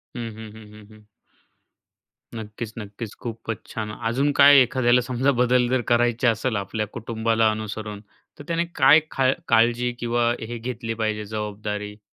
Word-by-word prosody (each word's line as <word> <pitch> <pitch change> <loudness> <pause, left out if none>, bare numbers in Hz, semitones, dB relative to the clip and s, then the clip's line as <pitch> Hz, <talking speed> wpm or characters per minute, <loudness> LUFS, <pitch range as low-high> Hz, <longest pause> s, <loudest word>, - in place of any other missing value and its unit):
हं, 115 -1 -4
हं, 110 -1 -10
हं, 110 0 -13
हं, 105 -1 -14
हं. 105 -1 -20 1.3
नक्कीच, 110 0 -7
नक्कीच. 105 0 -7
खूपच 115 -2 -6
छान. 110 -1 -4 0.2
अजून 135 +5 +1
काय 140 0 +9
एखाद्याला 125 0 +3
समजा 130 +3 0
बदल 125 -1 +2
जर 130 0 +1
करायचे 120 +1 +2
असेल 115 +1 0
आपल्या 105 +2 -3
कुटुंबाला 115 -1 0
अनुसरून 110 -1 -6 0.4
तर - - -8
त्याने 170 0 0
काय 140 +2 +7
खा 130 -1 +2 0.2
काळजी 120 +1 +3
किंवा 120 0 +1
हे 115 +2 -6
घेतली 115 -1 -4
पाहिजे 110 -1 -2
जबाबदारी? 105 0 -5
115 Hz, 150 wpm, -23 LUFS, 110-125 Hz, 1.3 s, काय